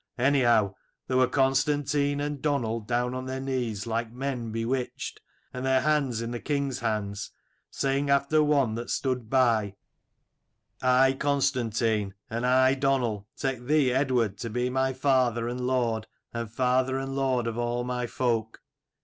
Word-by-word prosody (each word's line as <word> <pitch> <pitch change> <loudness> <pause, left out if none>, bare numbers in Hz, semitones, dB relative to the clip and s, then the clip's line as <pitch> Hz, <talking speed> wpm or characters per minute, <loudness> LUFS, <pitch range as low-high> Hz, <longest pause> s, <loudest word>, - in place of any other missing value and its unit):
Anyhow 120 -6 +3 0.3
there 130 - 0
were 130 0 +5
Constantine 140 +2 +1
and 145 -1 -3
Donal 125 -7 0
down 120 +3 -1
on 130 0 -5
their 130 0 -3
knees, 125 -6 -2
like 115 0 -2
men 125 -2 -4
bewitched, 120 +3 -3 0.3
and 125 - -5
their 130 0 +3
hands 140 -6 +1
in 115 - -4
the 120 - -4
king's 140 -2 -2
hands, 105 -4 -2 0.4
saying 140 +1 -1
after 140 +2 +3
one 140 -6 +2
that 120 +2 -5
stood 125 -4 -1
by 115 -6 +2 1.1
'I 130 +1 +4
Constantine, 115 -7 0 0.2
and 115 +2 -1
I 130 +1 +5
Donal, 130 -7 0
take 130 -3 -2
thee 145 -3 +3
Eadward 125 -6 +1
to 115 - -4
be 125 +3 -1
my 130 +1 +1
father 130 -3 +1
and 125 +1 -3
lord, 115 -4 0 0.3
and 115 -2 -4
father 130 +2 +1
and 135 0 -4
lord 130 -3 +1
of 115 0 -3
all 120 0 -1
my 125 0 -2
folk.' 115 -3 -1
125 Hz, 150 wpm, -27 LUFS, 115-135 Hz, 1.1 s, were